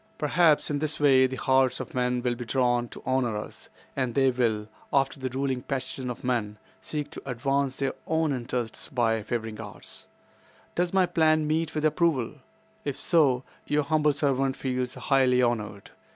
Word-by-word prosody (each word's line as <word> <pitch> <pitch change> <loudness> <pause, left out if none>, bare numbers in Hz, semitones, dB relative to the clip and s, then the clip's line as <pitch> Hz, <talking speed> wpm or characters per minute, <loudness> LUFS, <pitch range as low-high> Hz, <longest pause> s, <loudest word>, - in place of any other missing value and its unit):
Perhaps 150 0 +3
in 145 - 0
this 155 +1 -1
way 135 -3 +5
the 130 - -5
hearts 130 -1 +2
of 170 - -7
men 125 -1 0
will 125 -1 +1
be 120 +1 -6
drawn 120 -1 +1
to - - -12
honor 130 -4 +1
us, 105 - -8 0.3
and 130 -4 -1
they 135 -1 +4
will—after 120 +4 -1
the 130 -1 -2
ruling 130 0 -1
passion 130 -1 -4
of 125 - -6
men—seek 125 +5 -4
to - - -8
advance 135 +1 -1
their 135 -1 -1
own 160 -2 +1
interests 120 -2 -4
by 115 -3 +1
favoring 110 0 -4
ours. 105 -3 -11 0.7
Does 175 0 0
my 190 -1 +4
plan 155 -2 +3
meet 155 +1 -1
with 155 0 0
approval? 150 -5 +1 0.5
If 145 -2 -3
so, 140 -7 +3 0.2
your 150 0 +2
humble 150 0 +2
servant 135 -2 0
feels 125 -1 -2
highly 130 -2 +3
honored." 105 -4 -2
130 Hz, 165 wpm, -27 LUFS, 120-145 Hz, 0.7 s, way